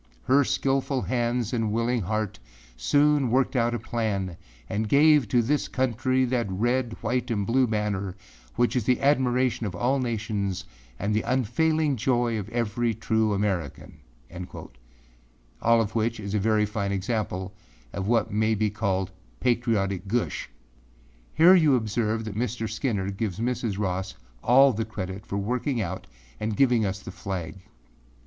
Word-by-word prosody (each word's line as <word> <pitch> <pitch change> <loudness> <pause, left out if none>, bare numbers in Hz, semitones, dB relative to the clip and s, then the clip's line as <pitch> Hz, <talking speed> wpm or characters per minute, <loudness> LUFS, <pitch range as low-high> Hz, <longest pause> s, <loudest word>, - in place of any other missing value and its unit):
Her 140 +2 +4
skillful 135 0 0
hands 120 -1 -1
and 115 -3 0
willing 115 +2 0
heart 110 +2 -2 0.4
soon 145 - +3
worked 130 +3 +1
out 120 -1 +2
a - - 0
plan 105 -6 -2 0.3
and 105 +5 -2
gave 150 -2 +5
to 120 +3 +2
this 145 +5 0
country 130 +1 +1
that 120 -4 -1
red, 120 +4 0
white 125 +3 -1
and 105 -4 0
blue 125 +4 +3
banner 105 -3 -2 0.4
which 120 +1 +1
is 120 -4 0
the 125 0 +2
admiration 130 -4 +2
of 90 - -6
all 130 +8 +1
nations 105 -5 -2 0.3
and 100 +7 -1
the 110 - +2
unfailing 135 +5 +1
joy 120 -1 +1
of 100 - -6
every 115 0 -1
true 110 0 +1
American.â 85 -5 -5 0.9
All 115 0 +4
of 110 -1 -1
which 115 0 0
is 100 -1 -5
a 105 - +2
very 105 +1 +2
fine 100 -1 -2
example 100 -2 -2 0.4
of 100 0 -3
what 115 -1 +1
may 110 +1 +2
be 105 0 0
called 95 -3 -1 0.3
âpatriotic 110 -6 0
gush.â 120 +4 -1 0.9
Here 170 +4 +8
you 155 -7 +5
observe 110 -1 -1
that 110 - -5
Mr. 115 +1 -2
Skinner 105 -4 -2
gives 100 -1 -3
Mrs. 115 -3 -1
Ross 95 -1 -2 0.3
all 135 +2 +6
the 110 +1 -1
credit 95 -2 -6
for 100 - -3
working 125 +5 -1
out 95 -3 -4 0.3
and 105 -1 -2
giving 120 -6 +3
us 95 +1 -3
the 95 - -8
flag. 95 -2 -5
110 Hz, 155 wpm, -26 LUFS, 100-125 Hz, 0.9 s, Here